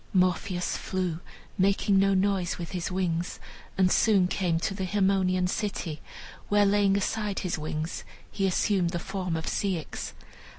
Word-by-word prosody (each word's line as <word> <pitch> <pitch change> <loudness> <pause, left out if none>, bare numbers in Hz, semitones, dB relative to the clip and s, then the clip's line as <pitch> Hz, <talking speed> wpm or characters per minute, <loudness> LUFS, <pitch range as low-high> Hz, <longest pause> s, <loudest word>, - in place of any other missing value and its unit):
Morpheus 180 0 +1
flew, 180 -3 -2 0.4
making 195 +1 +3
no 195 0 +4
noise 190 -2 +1
with 170 -2 -6
his 180 -1 -3
wings, 180 -2 -1 0.4
and 185 -1 +4
soon 200 -5 +4
came 175 -3 0
to 195 - -1
the 195 -1 -4
Haemonian 190 -1 +2
city, 180 -5 -3 0.5
where, 205 0 +4
laying 200 0 +3
aside 205 0 -1
his 180 -3 -2
wings, 155 +1 -4 0.3
he 195 -1 0
assumed 185 -1 +2
the 175 - -2
form 185 -1 -3
of 160 0 -3
Ceyx. 185 -6 -2
185 Hz, 145 wpm, -28 LUFS, 175-195 Hz, 0.5 s, no